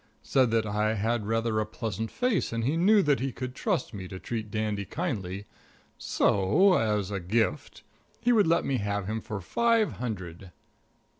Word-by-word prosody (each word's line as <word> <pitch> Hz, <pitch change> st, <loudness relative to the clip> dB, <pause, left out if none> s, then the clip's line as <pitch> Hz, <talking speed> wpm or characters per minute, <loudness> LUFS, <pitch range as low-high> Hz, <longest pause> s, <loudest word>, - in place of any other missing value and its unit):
Said 130 Hz, -3 st, +3 dB
that 115 Hz, -1 st, +1 dB
I 105 Hz, +1 st, 0 dB
had 110 Hz, +3 st, 0 dB
a -, -, -8 dB
rather 115 Hz, 0 st, 0 dB
pleasant 110 Hz, 0 st, -4 dB
face 250 Hz, -6 st, 0 dB
and 115 Hz, 0 st, -2 dB
he 140 Hz, +7 st, +1 dB
knew 200 Hz, +4 st, +5 dB
that 145 Hz, -2 st, +2 dB
he 135 Hz, +1 st, -2 dB
could 125 Hz, +1 st, -6 dB
trust 125 Hz, -, -1 dB
me 95 Hz, -3 st, -6 dB
to 95 Hz, -, -7 dB
treat 110 Hz, +2 st, -5 dB
Dandy 105 Hz, -1 st, -2 dB
kindly; 100 Hz, -, -4 dB, 0.5 s
so 150 Hz, -, +3 dB
as 105 Hz, -, +1 dB
a 100 Hz, -, -2 dB
gift 110 Hz, +6 st, -1 dB, 0.4 s
he 245 Hz, -, +2 dB
would 215 Hz, -7 st, +4 dB
let 165 Hz, -, +2 dB
me 135 Hz, -, 0 dB
have 100 Hz, -2 st, -2 dB
him 110 Hz, +2 st, -3 dB
for 105 Hz, -2 st, -5 dB
five 230 Hz, -, +2 dB
hundred. 95 Hz, -7 st, -6 dB
110 Hz, 175 wpm, -28 LUFS, 100-135 Hz, 0.5 s, knew